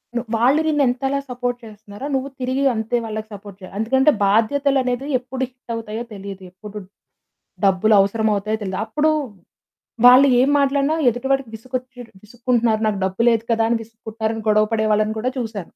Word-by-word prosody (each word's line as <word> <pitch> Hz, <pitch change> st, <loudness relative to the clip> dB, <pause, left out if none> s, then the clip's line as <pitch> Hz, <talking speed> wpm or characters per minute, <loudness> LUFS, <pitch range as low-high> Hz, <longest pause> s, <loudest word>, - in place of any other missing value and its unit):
ను 240 Hz, -, 0 dB
వాళ్ళు 260 Hz, +7 st, +3 dB
నిన్నెంతలా 275 Hz, -2 st, +1 dB
సపోర్ట్ 245 Hz, 0 st, -3 dB
చేస్తున్నారో, 210 Hz, +2 st, -10 dB
నువ్వు 265 Hz, +1 st, -2 dB
తిరిగి 260 Hz, +2 st, -1 dB
అంతే 220 Hz, +2 st, -1 dB
వాళ్ళకి 220 Hz, 0 st, -5 dB
సపోర్ట్ 200 Hz, -1 st, -11 dB
చెయ్యాలి. 185 Hz, +1 st, -12 dB
ఎందుకంటే 265 Hz, +6 st, +3 dB
బాధ్యతలు 265 Hz, +7 st, +2 dB
అనేది 250 Hz, +1 st, -2 dB
ఎప్పుడు 260 Hz, +1 st, -5 dB
హిట్ 250 Hz, -2 st, -13 dB
అవుతాయో 225 Hz, 0 st, -5 dB
తెలియదు. 195 Hz, -1 st, -8 dB
ఎప్పుడు 210 Hz, +3 st, -11 dB, 0.9 s
డబ్బులవసరం 205 Hz, +2 st, +3 dB
అవుతాయో 215 Hz, +2 st, -2 dB
తెలీదు. 190 Hz, 0 st, -4 dB
అప్పుడు 300 Hz, +7 st, +1 dB, 0.9 s
వాళ్ళు 255 Hz, +3 st, +8 dB
ఏం 260 Hz, +3 st, +3 dB
మాట్లాడినా 280 Hz, +2 st, +1 dB
ఎదుటి 245 Hz, +3 st, -4 dB
వాడికి 270 Hz, -3 st, 0 dB
విసుగొచ్చి 255 Hz, +2 st, -7 dB, 0.2 s
విసుక్కుంటున్నారు, 235 Hz, -1 st, 0 dB
"నాకు 210 Hz, -2 st, 0 dB
డబ్బు 190 Hz, +4 st, -2 dB
లేదు 225 Hz, -1 st, +1 dB
కదా" 225 Hz, 0 st, +2 dB
అని 235 Hz, -, +2 dB
విసుక్కుంటున్నారు 220 Hz, 0 st, -5 dB
అని 225 Hz, -, -6 dB
గొడవ 215 Hz, 0 st, +4 dB
పడే 220 Hz, -1 st, +1 dB
వాళ్ళని 215 Hz, +1 st, 0 dB
కూడా 255 Hz, +3 st, -1 dB
చూసాను. 220 Hz, -4 st, -4 dB
230 Hz, 160 wpm, -20 LUFS, 215-255 Hz, 0.9 s, వాళ్ళు